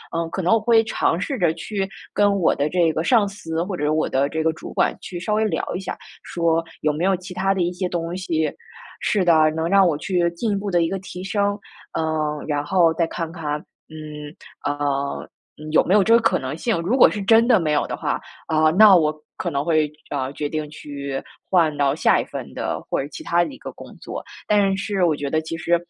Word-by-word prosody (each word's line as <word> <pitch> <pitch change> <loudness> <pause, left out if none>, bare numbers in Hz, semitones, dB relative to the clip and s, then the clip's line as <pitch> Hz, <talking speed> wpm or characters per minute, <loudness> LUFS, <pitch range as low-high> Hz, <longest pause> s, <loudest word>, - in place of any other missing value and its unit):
嗯， 165 0 -1
可 190 - -3
能 180 - +3
我 225 - +4
会 225 +1 +4
尝 200 -6 0
试 270 +7 -3
着， 175 -4 +3
去 195 +3 -3 0.2
跟 205 -1 +3
我 175 - +3
的 145 +2 0
这 170 -1 +2
个 160 - -1
上 220 +1 +4
司 165 -5 -4
或 185 +1 -4
者 150 -2 0
我 155 0 +1
的 135 +2 +1
这 160 +1 -2
个 160 - +2
主 - - -9
管 - - +1
去 175 - -6
稍 210 +4 -2
微 215 +1 +2
聊 175 -7 -2
一 - - -2
下， 190 - -5 0.2
说 165 -1 0 0.2
有 150 -1 +1
没 155 - -3
有 195 - +3
其 180 +1 -9
它 190 +2 +1
的 185 - 0
一 175 +1 -1
些 180 0 -3
东 170 0 -3
西 165 -4 -1 0.5
是 200 -4 +1
的， 155 -2 +5
能 160 0 -1
让 195 0 +5
我 155 - 0
去 175 +1 0
进 215 +5 -1
一 200 - +1
步 200 +1 -3
地 175 -2 +2
一 165 - +1
个 195 - -3
提 180 -1 -8
升。 200 +1 0 0.3
呃， 155 -2 -1
然 145 -1 -1
后 170 +1 +3
再 165 0 +2
看 165 -1 -4
看， 150 -3 -3 0.3
嗯， 150 -1 -9 0.3
呃， 145 -1 -2 0.4
有 155 - +5
没 185 - +2
有 210 - +6
这 225 - +4
个 230 - +7
可 - - +2
能 130 +3 -4
性， 220 -1 0
如 215 +10 0
果 - - +8
是 210 - -4
真 225 +3 +5
的 240 -5 +5
没 155 -3 0
有 145 - +2
的 - - -3
话， - - -1 0.3
呃， 155 0 +3
那 205 +1 +8
我 155 -3 +3 0.2
可 - - -2
能 140 0 -1
会， 155 -3 +2 0.2
呃， 135 -2 -2
决 145 0 -3
定 155 -1 -3
去 140 -2 -6 0.3
换 165 -5 +3
到 140 -1 +2
下 - - +3
一 - - -6
份 - - -7
的 - - -3
或 - - 0
者 135 - -5
其 - - -8
它 170 0 +2
的 - - -4
一 - - -11
个 - - -8
工 - - -13
作。 - - -6 0.3
但 200 -2 +3
是 200 -2 -1
我 160 - +2
觉 145 -1 -4
得 155 +2 +1
其 160 +1 -5
实， 170 +1 +2
170 Hz, 260 characters per minute, -22 LUFS, 155-195 Hz, 0.5 s, 果